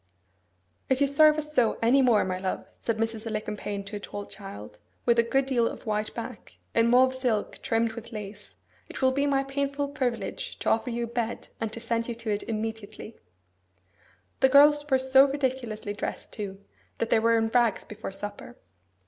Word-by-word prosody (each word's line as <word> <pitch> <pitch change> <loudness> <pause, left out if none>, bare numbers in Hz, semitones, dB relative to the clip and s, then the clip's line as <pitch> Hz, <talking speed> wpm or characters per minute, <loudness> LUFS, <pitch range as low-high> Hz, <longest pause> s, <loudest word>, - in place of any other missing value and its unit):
'If 265 - +2
you 285 - +5
serve 300 +2 +5
us 300 0 -3
so 240 -6 +3
any 245 +4 +4
more, 235 -6 +4
my 185 0 -2
love,' 185 0 -3 0.2
said 230 -1 -1
Mrs. 225 0 -2
Alicumpaine 210 -2 -4
to 205 +2 -6
a - - -7
tall 205 0 -7
child, 105 - -10 0.3
with 235 -1 +4
a - - +9
good 270 +4 +1
deal 245 -4 +2
of - - -7
white 215 -1 -1
back, 235 0 -8 0.2
in 230 0 +4
mauve 255 +2 +5
silk 245 -5 -1
trimmed 225 0 +1
with 230 +1 -9
lace, 210 -2 -8 0.3
'it - - -6
will 260 - +5
be 280 +2 +1
my 275 -1 +2
painful 280 +1 -2
privilege 255 -5 -3
to - - -1
offer 230 +3 +1
you 235 0 -2
a - - -2
bed, 235 -1 -3
and 225 -1 -2
to 230 - -5
send 230 0 -1
you 235 - -3
to 230 -2 -4
it 205 - 0
immediately.' 220 0 -5 1.2
The 265 - +5
girls 295 +2 +6
were 265 - +5
so 265 +1 +5
ridiculously 255 -7 -2
dressed, 205 - -5
too, 195 -2 -6 0.4
that 230 - -2
they 225 - +5
were 230 +1 +3
in 225 0 +1
rags 235 -2 +2
before 210 -1 -7
supper. 200 - -7
230 Hz, 190 wpm, -27 LUFS, 215-265 Hz, 1.2 s, a